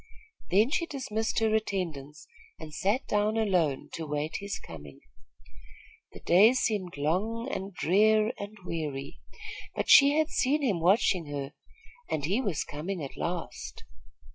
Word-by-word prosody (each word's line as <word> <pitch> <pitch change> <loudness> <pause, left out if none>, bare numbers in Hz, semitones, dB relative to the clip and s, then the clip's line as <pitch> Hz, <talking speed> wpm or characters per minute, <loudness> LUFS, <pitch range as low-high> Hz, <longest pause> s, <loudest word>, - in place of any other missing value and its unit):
Then 215 +8 +3
she 335 - 0
dismissed 225 -7 -3
her 220 -1 +2
attendants 155 -9 -3 0.3
and 155 -1 -9
sat 210 - 0
down 210 +1 +1
alone 180 -10 +1
to 160 -1 -5
wait 150 +2 -2
his 200 0 -4
coming. 75 -3 -11 1.1
The - - -11
day 205 +8 +6
seemed 205 - -1
long 205 - -1
and 195 +1 -4
drear 215 +5 +3
and 205 +1 -7
weary; 150 -5 -5 0.6
but - - 0
she 285 +1 +8
had 315 0 +2
seen 285 +2 +1
him 205 -10 +1
watching 180 -1 +3
her, 140 -1 -5 0.6
and 145 -2 -1
he 200 - +1
was 200 - -1
coming 165 +3 -5
at 135 - -7
last. 170 0 -5
195 Hz, 140 wpm, -28 LUFS, 155-220 Hz, 1.1 s, she